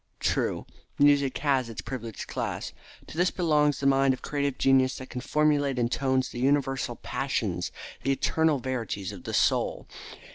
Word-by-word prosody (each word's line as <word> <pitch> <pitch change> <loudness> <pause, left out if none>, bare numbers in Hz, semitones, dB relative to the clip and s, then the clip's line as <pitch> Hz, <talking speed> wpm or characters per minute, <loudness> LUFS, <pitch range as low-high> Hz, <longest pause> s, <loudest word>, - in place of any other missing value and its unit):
True, - - 0 0.3
music 140 -2 +4
has 135 -4 +1
its 115 - -6
privileged 115 -4 -6
class. - - -4 0.3
To - - -11
this 180 +1 +3
belongs 150 -5 +2
the 140 - -3
mind 135 -1 +4
of - - -19
creative 140 -2 -1
genius 130 -1 +3
that 130 - -9
can 125 - -4
formulate 145 -2 +1
in 120 -1 +1
tones 130 0 0
the 120 - -7
universal 135 -2 +1
passions, 105 -12 -2 0.3
the 135 - 0
eternal 160 +2 +2
verities 120 -7 -3
of - - -11
the - - -4
soul. - - +1
135 Hz, 160 wpm, -27 LUFS, 130-145 Hz, 0.3 s, music